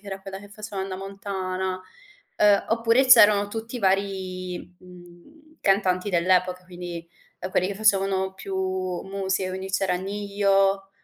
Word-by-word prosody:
era 195 Hz, -2 st, -7 dB
quella 195 Hz, 0 st, -8 dB
che 205 Hz, -, -13 dB
faceva 205 Hz, -1 st, -6 dB
Hannah 190 Hz, -1 st, -5 dB
Montana. 190 Hz, -1 st, -4 dB, 0.6 s
Uhm, 205 Hz, -1 st, +4 dB
oppure 230 Hz, +3 st, +3 dB
c'erano 205 Hz, -5 st, +7 dB
tutti 225 Hz, +3 st, -6 dB
i -, -, -6 dB
vari, 190 Hz, -2 st, -2 dB
mhmm, 180 Hz, -, -17 dB
cantanti 195 Hz, 0 st, +1 dB
dell'epoca, 180 Hz, +1 st, +2 dB
quindi, 175 Hz, -2 st, -8 dB, 0.3 s
ehm, 185 Hz, -, -5 dB
quelli 185 Hz, -, +1 dB
che 200 Hz, -, -2 dB
facevano 195 Hz, -2 st, +1 dB
più 195 Hz, 0 st, -6 dB, 0.5 s
musica, 190 Hz, -1 st, -2 dB
quindi 190 Hz, +1 st, -6 dB
c'era 190 Hz, -1 st, +1 dB
Ne-Yo, 195 Hz, 0 st, 0 dB
195 Hz, 135 wpm, -25 LUFS, 185-200 Hz, 0.6 s, c'erano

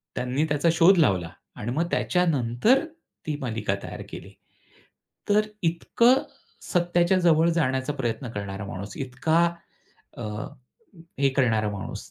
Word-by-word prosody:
त्यांनी 125 Hz, +4 st, 0 dB
त्याचा 145 Hz, +3 st, +1 dB
शोध 175 Hz, +3 st, +6 dB
लावला 95 Hz, -, +2 dB, 0.3 s
आणि 110 Hz, -, -4 dB
मग 165 Hz, +5 st, 0 dB
त्याच्यानंतर 180 Hz, -, +2 dB, 0.4 s
ती 150 Hz, -2 st, -2 dB
मालिका 110 Hz, -5 st, -2 dB
तयार -, -, -7 dB
केली. -, -, -10 dB, 1.0 s
तर 205 Hz, +1 st, +5 dB, 0.2 s
इतकं 235 Hz, +10 st, +3 dB, 0.5 s
सत्याच्या 175 Hz, +1 st, +2 dB
जवळ 165 Hz, -1 st, +4 dB
जाण्याचा 130 Hz, -4 st, 0 dB
प्रयत्न 125 Hz, -1 st, -3 dB
करणारा 100 Hz, -2 st, -5 dB
माणूस, 100 Hz, +1 st, -7 dB
इतका 135 Hz, +6 st, +1 dB, 0.7 s
अ, -, -, -6 dB, 1.0 s
हे 140 Hz, 0 st, +4 dB
करणारा 110 Hz, -5 st, +2 dB
माणूस 100 Hz, -1 st, -7 dB
140 Hz, 120 wpm, -25 LUFS, 115-170 Hz, 1.0 s, शोध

